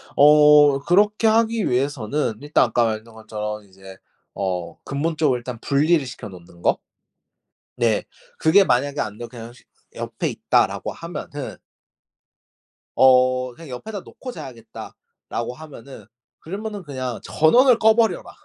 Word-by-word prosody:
어 150 Hz, -1 st, +6 dB
그렇게 205 Hz, +8 st, +2 dB
하기 225 Hz, 0 st, +2 dB
위해서는 130 Hz, 0 st, -1 dB
일단 145 Hz, -2 st, +2 dB
아까 120 Hz, 0 st, +1 dB
말했던 110 Hz, +1 st, -4 dB
것처럼 105 Hz, -1 st, -6 dB
이제 95 Hz, 0 st, -14 dB, 0.4 s
어 90 Hz, -3 st, -3 dB
근본적으로 150 Hz, -2 st, 0 dB
일단 120 Hz, -1 st, -7 dB
분리를 150 Hz, +2 st, +2 dB
시켜 125 Hz, -3 st, -8 dB
놓는 85 Hz, -2 st, -15 dB
거? -, -, +2 dB, 1.0 s
네 115 Hz, -3 st, +1 dB, 0.3 s
그게 160 Hz, +6 st, +5 dB
만약에 140 Hz, -1 st, 0 dB
안되고 110 Hz, +3 st, -6 dB
그냥 115 Hz, -1 st, -10 dB
시 125 Hz, -, -20 dB, 0.3 s
'옆에 -, -, -4 dB
있다.'라고 -, -, 0 dB
하면은 150 Hz, -4 st, -7 dB, 1.4 s
어 130 Hz, -1 st, +4 dB
그냥 165 Hz, +4 st, -13 dB
'옆에다 200 Hz, -, -7 dB
놓고 255 Hz, -, -10 dB
자야겠다.'라고 120 Hz, -, -9 dB
하면은 135 Hz, -6 st, -12 dB, 0.3 s
그러면은 205 Hz, +3 st, -6 dB
그냥 130 Hz, -5 st, -5 dB
전원을 240 Hz, -, +4 dB
꺼 220 Hz, 0 st, +5 dB
버려라! 225 Hz, -1 st, 0 dB
135 Hz, 290 characters per minute, -22 LUFS, 115-160 Hz, 1.4 s, 어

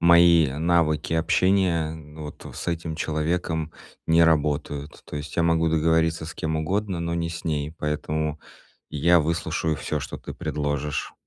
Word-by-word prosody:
мои 85 Hz, -2 st, +6 dB
навыки 80 Hz, 0 st, +1 dB
общения, 85 Hz, -1 st, +2 dB
ну, 75 Hz, -1 st, -10 dB
вот 75 Hz, -, -9 dB
с -, -, -6 dB
этим 80 Hz, -1 st, -3 dB
человеком 80 Hz, 0 st, -1 dB, 0.3 s
не 85 Hz, 0 st, +5 dB
работают. 75 Hz, -2 st, 0 dB
То -, -, -7 dB
есть 75 Hz, +1 st, -6 dB
я 85 Hz, -, +3 dB
могу 80 Hz, 0 st, +3 dB
договориться 80 Hz, 0 st, +2 dB
с 80 Hz, -, -6 dB
кем 80 Hz, 0 st, -2 dB
угодно, 95 Hz, +3 st, -1 dB
но 85 Hz, 0 st, -2 dB
не 85 Hz, 0 st, -1 dB
с 85 Hz, +1 st, -7 dB
ней. 75 Hz, -1 st, -2 dB
Поэтому 75 Hz, 0 st, -2 dB, 0.5 s
я 85 Hz, +4 st, +4 dB
выслушаю 80 Hz, 0 st, -1 dB
всё, 75 Hz, -1 st, -3 dB
что 70 Hz, -, -6 dB
ты -, -, -8 dB
предложишь. 75 Hz, 0 st, -2 dB
80 Hz, 155 wpm, -25 LUFS, 75-85 Hz, 0.5 s, мои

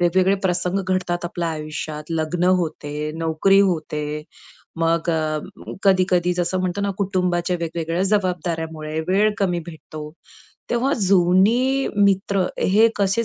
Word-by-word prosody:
वेगवेगळे 185 Hz, +3 st, +3 dB
प्रसंग 180 Hz, 0 st, 0 dB
घडतात 180 Hz, -2 st, -1 dB
आपल्या 175 Hz, 0 st, -2 dB
आयुष्यात. 155 Hz, -1 st, -5 dB
लग्न 165 Hz, +2 st, -1 dB, 0.2 s
होते, 150 Hz, -2 st, -4 dB
नोकरी 165 Hz, +5 st, +3 dB
होते, 150 Hz, -5 st, -1 dB, 0.5 s
मग 165 Hz, +1 st, +1 dB
अ, 155 Hz, -1 st, 0 dB, 0.4 s
कधी-कधी 185 Hz, -2 st, +3 dB
जसं 180 Hz, +1 st, 0 dB
म्हणतो 185 Hz, +1 st, -2 dB
ना 200 Hz, 0 st, 0 dB
कुटुंबाच्या 180 Hz, -2 st, 0 dB
वेगवेगळ्या 165 Hz, +1 st, -2 dB
जबाबदाऱ्यामुळे 165 Hz, -5 st, -1 dB
वेळ 205 Hz, +3 st, +3 dB
कमी 180 Hz, -3 st, +1 dB
भेटतो. 155 Hz, -2 st, -9 dB, 0.6 s
तेव्हा 250 Hz, +4 st, +1 dB
जुनी 200 Hz, +8 st, +3 dB
मित्र 195 Hz, -1 st, +2 dB
हे 215 Hz, +4 st, +4 dB
कसे 200 Hz, +3 st, +1 dB
180 Hz, 120 wpm, -22 LUFS, 160-195 Hz, 0.6 s, हे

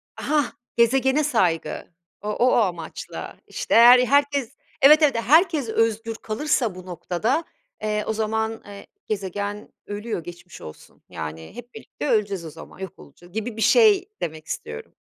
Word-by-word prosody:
Hah, 295 Hz, -4 st, 0 dB, 0.3 s
gezegene 265 Hz, +5 st, +3 dB
saygı. 175 Hz, -, -1 dB, 0.3 s
O 210 Hz, -, -4 dB
o 225 Hz, +4 st, +1 dB
o -, -, +4 dB
amaçla, 175 Hz, -8 st, -3 dB
işte, -, -, -4 dB
eğer 240 Hz, +2 st, +9 dB
herkes, 280 Hz, 0 st, +1 dB, 0.2 s
evet, 300 Hz, +3 st, +8 dB
evet. 290 Hz, -4 st, +4 dB
Herkes 305 Hz, -, +3 dB
özgür 225 Hz, 0 st, 0 dB
kalırsa 225 Hz, -2 st, -1 dB
bu 185 Hz, 0 st, -10 dB
noktada, 185 Hz, -, -2 dB, 0.4 s
eee, 210 Hz, 0 st, -1 dB
o 220 Hz, -, 0 dB
zaman, 220 Hz, +1 st, -2 dB
eee, 200 Hz, -1 st, -11 dB, 0.2 s
gezegen 205 Hz, +1 st, -4 dB
ölüyor, 205 Hz, -4 st, -5 dB
geçmiş 175 Hz, +1 st, -11 dB
olsun. 75 Hz, -, -13 dB
Yani, 80 Hz, +1 st, -7 dB
hep 245 Hz, +1 st, -11 dB
birlikte 225 Hz, +6 st, -7 dB
öleceğiz 200 Hz, -5 st, 0 dB
o -, -, -6 dB
zaman 165 Hz, +3 st, -13 dB
yok 190 Hz, -2 st, -8 dB
olacağız, 175 Hz, +6 st, -17 dB
gibi 220 Hz, +1 st, -4 dB
bir -, -, -4 dB
şey 420 Hz, -, +5 dB
demek 155 Hz, -1 st, -5 dB
istiyorum. 75 Hz, 0 st, -7 dB
220 Hz, 150 wpm, -23 LUFS, 185-260 Hz, 0.4 s, eğer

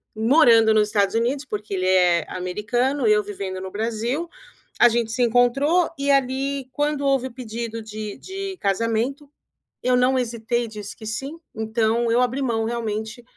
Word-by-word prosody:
morando 225 Hz, -2 st, +5 dB
no 215 Hz, -, +5 dB
Estados 210 Hz, 0 st, +1 dB
Unidos, 255 Hz, +5 st, 0 dB
porque 210 Hz, -3 st, -5 dB
ele 185 Hz, -1 st, 0 dB
é 180 Hz, -3 st, +3 dB
americano, 225 Hz, +8 st, -1 dB
eu 210 Hz, 0 st, +4 dB
vivendo 195 Hz, -2 st, -5 dB
no 190 Hz, 0 st, -6 dB
Brasil, 235 Hz, +9 st, -2 dB, 0.5 s
a 240 Hz, -, +8 dB
gente 230 Hz, -1 st, -1 dB
se 250 Hz, +1 st, +1 dB
encontrou, 270 Hz, +9 st, +3 dB
e 280 Hz, 0 st, +1 dB
ali 270 Hz, 0 st, 0 dB
quando 295 Hz, -1 st, -1 dB
houve 265 Hz, -1 st, +1 dB
pedido 230 Hz, -2 st, -6 dB
de 215 Hz, 0 st, -7 dB
de 385 Hz, 0 st, -6 dB
casamento, 230 Hz, +8 st, -1 dB, 0.6 s
eu 250 Hz, 0 st, +3 dB
não 255 Hz, +1 st, +3 dB
hesitei, 235 Hz, 0 st, -2 dB
disse 210 Hz, -2 st, -8 dB
que 220 Hz, -, -10 dB
sim, 270 Hz, +9 st, -5 dB, 0.2 s
então 225 Hz, +1 st, 0 dB
eu 245 Hz, +2 st, +3 dB
abri 255 Hz, +3 st, 0 dB
mão 225 Hz, -4 st, 0 dB
realmente 225 Hz, 0 st, -4 dB
235 Hz, 155 wpm, -23 LUFS, 215-265 Hz, 0.6 s, a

